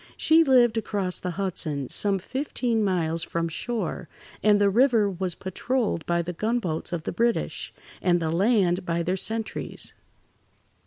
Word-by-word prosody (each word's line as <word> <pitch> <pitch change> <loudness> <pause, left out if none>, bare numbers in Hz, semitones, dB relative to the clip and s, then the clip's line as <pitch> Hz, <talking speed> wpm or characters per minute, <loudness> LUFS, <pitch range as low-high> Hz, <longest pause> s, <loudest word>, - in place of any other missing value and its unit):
She 325 +1 +5
lived 245 -5 +4
across 200 -4 -2
the 180 - -3
Hudson, 155 -8 -2
some 200 +6 +1
fifteen 245 0 -1
miles 165 -4 0
from 165 0 -2
shore, 185 -1 -4 0.3
and 210 -1 +4
the 200 -1 +4
river 235 -1 +4
was 185 -2 -3
patrolled 210 -1 -2
by 170 0 +1
the 175 +1 -5
gunboats 200 -5 -2
of 170 -3 -3
the - - -3
British, 235 +5 -1 0.3
and 175 -1 +3
the 160 -1 -1
land 190 -1 +2
by 170 -1 -1
their 180 +2 0
sentries. 220 +3 -3
195 Hz, 150 wpm, -25 LUFS, 170-225 Hz, 0.3 s, She